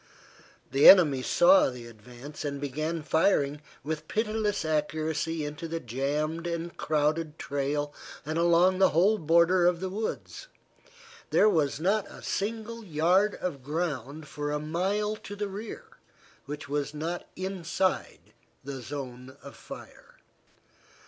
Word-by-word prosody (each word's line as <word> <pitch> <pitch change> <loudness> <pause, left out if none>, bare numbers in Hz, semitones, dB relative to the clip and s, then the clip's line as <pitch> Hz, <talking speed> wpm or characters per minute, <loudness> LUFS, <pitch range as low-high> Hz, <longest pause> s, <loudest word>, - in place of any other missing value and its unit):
The 135 +2 +8
enemy 155 -9 +7
saw 270 - +5
the 125 -2 -9
advance 120 +6 -10
and 140 -1 -3
began 155 +4 -3
firing 150 -3 +2 0.2
with 155 +1 -4
pitiless 215 -3 -1
accuracy 155 +1 -1
into 150 +3 -6
the 165 0 -3
jammed 150 +6 -2
and 170 0 -4
crowded 155 +1 0
trail 145 +1 -2 0.3
and 155 +2 -2
along 175 +2 +4
the 190 - +6
whole 205 +5 +4
border 170 +2 +4
of 175 -1 +2
the 190 0 -4
woods. 220 - -5 0.8
There - - +5
was 155 -8 +1
not 200 +4 +1
a - - -12
single 225 +2 -3
yard 180 +4 +2
of 150 -7 -4
ground 150 -1 -3
for 145 +1 -4
a 150 - 0
mile 190 +7 -1
to 205 - -9
the 205 0 -3
rear 205 +3 -7 0.6
which 145 0 -6
was 145 +1 -2
not 165 +3 -4
inside 185 - -2 0.3
the 135 -1 -6
zone 130 0 -7
of - - -10
fire. - - -12
160 Hz, 135 wpm, -28 LUFS, 145-185 Hz, 0.8 s, The